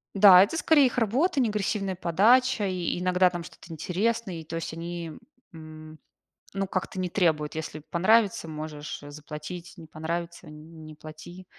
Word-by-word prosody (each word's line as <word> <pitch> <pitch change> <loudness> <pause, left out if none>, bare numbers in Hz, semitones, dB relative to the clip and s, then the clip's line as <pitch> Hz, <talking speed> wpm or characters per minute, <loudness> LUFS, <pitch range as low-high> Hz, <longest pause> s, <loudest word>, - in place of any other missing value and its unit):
Да, 195 -2 +9
это 270 +11 -2
скорее 310 -4 +4
их 250 - -6
работа, 265 - +1
не 240 -4 +2
агрессивная 200 -2 -2
подача, 210 +7 +3
и 180 -1 -2
иногда 185 0 +3
там 175 -1 -6
что-то 170 - -14
интересное, 195 +5 -2
и 160 - -9
то 165 +2 -7
есть, 165 -1 -4
они, 170 0 -6 0.4
м, 155 -1 -12 0.6
ну 195 0 -1
как-то 185 0 -4
не 185 - -1
требуют. 160 -6 0
Если 155 -1 -5
понравится 190 +2 +2
можешь 155 -1 -7
заплатить, 150 +4 -9
не 165 -3 -12
понравится 170 +2 -5
не 155 0 -12
плати. 155 +4 -12
175 Hz, 155 wpm, -26 LUFS, 155-195 Hz, 0.6 s, Да